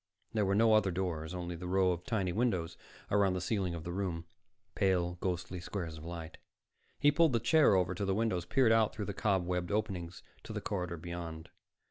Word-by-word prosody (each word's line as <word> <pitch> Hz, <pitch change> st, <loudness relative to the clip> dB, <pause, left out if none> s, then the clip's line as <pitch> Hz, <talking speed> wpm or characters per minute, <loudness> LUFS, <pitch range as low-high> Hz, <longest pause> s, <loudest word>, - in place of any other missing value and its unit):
There 105 Hz, -3 st, +1 dB
were 100 Hz, -, +2 dB
no 110 Hz, +1 st, +5 dB
other 110 Hz, -3 st, +4 dB
doors, 85 Hz, -2 st, -3 dB
only 90 Hz, -1 st, -4 dB
the 90 Hz, +2 st, -6 dB
row 95 Hz, 0 st, +3 dB
of 90 Hz, 0 st, -3 dB
tiny 95 Hz, -6 st, 0 dB
windows 90 Hz, -7 st, 0 dB, 0.4 s
around 100 Hz, -2 st, +3 dB
the 90 Hz, -, -1 dB
ceiling 90 Hz, -2 st, -1 dB
of 80 Hz, -, -6 dB
the 85 Hz, -, -5 dB
room, 85 Hz, -3 st, -3 dB, 0.5 s
pale, 90 Hz, -3 st, +1 dB
ghostly 90 Hz, 0 st, -2 dB
squares 85 Hz, -2 st, -5 dB
of -, -, -11 dB
light. 85 Hz, -1 st, -7 dB, 0.6 s
He 145 Hz, -, +5 dB
pulled 160 Hz, -1 st, +4 dB
the 115 Hz, -, +3 dB
chair 155 Hz, -9 st, +5 dB
over 90 Hz, -1 st, +2 dB
to 100 Hz, +3 st, -2 dB
the 95 Hz, 0 st, +1 dB
windows, 105 Hz, -5 st, 0 dB
peered 125 Hz, +3 st, +3 dB
out 115 Hz, -1 st, +3 dB
through 105 Hz, -2 st, -3 dB
the 100 Hz, -, -4 dB
cobwebbed 90 Hz, -3 st, 0 dB
openings 95 Hz, -5 st, -2 dB, 0.2 s
to -, -, -6 dB
the -, -, -2 dB
corridor 90 Hz, -3 st, -3 dB
beyond. 85 Hz, -1 st, -6 dB
90 Hz, 200 wpm, -33 LUFS, 85-105 Hz, 0.6 s, no